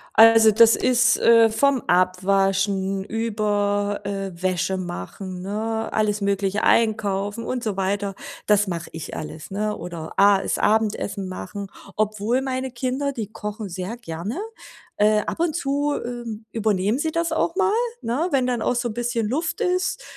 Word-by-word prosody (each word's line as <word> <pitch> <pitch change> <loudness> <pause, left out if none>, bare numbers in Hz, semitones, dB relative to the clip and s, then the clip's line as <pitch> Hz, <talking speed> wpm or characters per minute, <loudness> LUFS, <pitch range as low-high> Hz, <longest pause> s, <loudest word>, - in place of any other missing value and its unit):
Also, 225 0 +8
das 230 +1 +6
ist, 245 -1 +3
äh 230 -1 +6
vom 270 +3 +2
Abwaschen 195 +1 +1
über, 205 -2 -1
äh, 195 -1 -3
Wäsche 185 +1 -1
machen, 180 - -6
ne, 220 +3 -3
alles 210 -1 +1
Mögliche, 200 0 0
Einkaufen 210 -1 +1
und 255 -1 -3
so 210 -3 -2
weiter, 195 +1 -1 0.3
das 210 -1 +3
mache 170 -2 -4
ich 160 -1 -7
alles, 155 +3 -7
ne? 210 +1 -1
Oder 170 -2 -7
A 200 -1 +5
das - - -1
Abendessen 210 -3 0
machen. 195 +2 -6 0.3
Obwohl, 215 +4 0
meine 260 -1 -3
Kinder, 260 +3 -2
die 220 -4 -4
kochen 210 -1 -6
sehr 185 +5 -5
gerne. 205 - -6 0.6
Äh, 210 +1 +4
ab - - -5
und 330 -2 0
zu, 290 -2 0
ähm, 235 -2 -6
übernehmen 215 +1 0
sie 320 +1 -1
das 335 0 -1
auch 330 +1 0
mal, 395 +1 +2 0.3
ne, 265 +9 -1
wenn 260 -2 +2
dann 245 -2 -1
auch 250 - +1
so 240 0 -1
'n 215 - -5
bisschen 240 -2 -1
Luft 320 - -2
ist, 365 -2 0
215 Hz, 160 wpm, -23 LUFS, 195-240 Hz, 0.6 s, Also